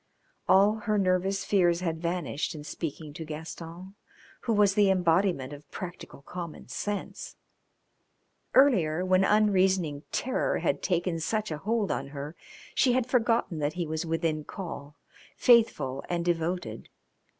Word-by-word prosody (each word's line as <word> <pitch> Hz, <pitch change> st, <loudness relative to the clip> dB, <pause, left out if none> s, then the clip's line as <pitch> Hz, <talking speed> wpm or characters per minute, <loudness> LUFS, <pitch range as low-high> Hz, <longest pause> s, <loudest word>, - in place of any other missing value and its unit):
All 200 Hz, +3 st, +5 dB
her 210 Hz, -, +3 dB
nervous 190 Hz, 0 st, +1 dB
fears 175 Hz, -3 st, +3 dB
had 165 Hz, -3 st, -2 dB
vanished 170 Hz, -3 st, -2 dB
in 150 Hz, -, -8 dB
speaking 155 Hz, -1 st, -6 dB
to 160 Hz, -, -6 dB
Gaston, 165 Hz, +4 st, -8 dB, 0.5 s
who 235 Hz, -, +2 dB
was 205 Hz, -2 st, +4 dB
the 205 Hz, -1 st, +4 dB
embodiment 175 Hz, -6 st, +2 dB
of 145 Hz, 0 st, -12 dB
practical 175 Hz, -5 st, -8 dB
common 170 Hz, -4 st, -7 dB
sense; 205 Hz, +10 st, -4 dB, 1.2 s
earlier, 185 Hz, -, +4 dB
when 185 Hz, 0 st, +4 dB
unreasoning 190 Hz, -7 st, +3 dB
terror 260 Hz, -, 0 dB
had -, -, 0 dB
taken 175 Hz, -2 st, 0 dB
such 215 Hz, +4 st, -1 dB
a 150 Hz, -, -3 dB
hold 215 Hz, +3 st, 0 dB
on -, -, -2 dB
her, 145 Hz, +3 st, -7 dB, 0.4 s
she 255 Hz, -2 st, +3 dB
had 255 Hz, -1 st, +2 dB
forgotten 230 Hz, -8 st, +1 dB
that 145 Hz, 0 st, -1 dB
he 175 Hz, 0 st, -2 dB
was 160 Hz, 0 st, -3 dB
within 165 Hz, -2 st, -1 dB
call, 150 Hz, -5 st, -7 dB, 0.4 s
faithful 155 Hz, -, +3 dB
and 170 Hz, -1 st, -1 dB
devoted. 175 Hz, +1 st, -2 dB
175 Hz, 140 wpm, -28 LUFS, 160-200 Hz, 1.2 s, All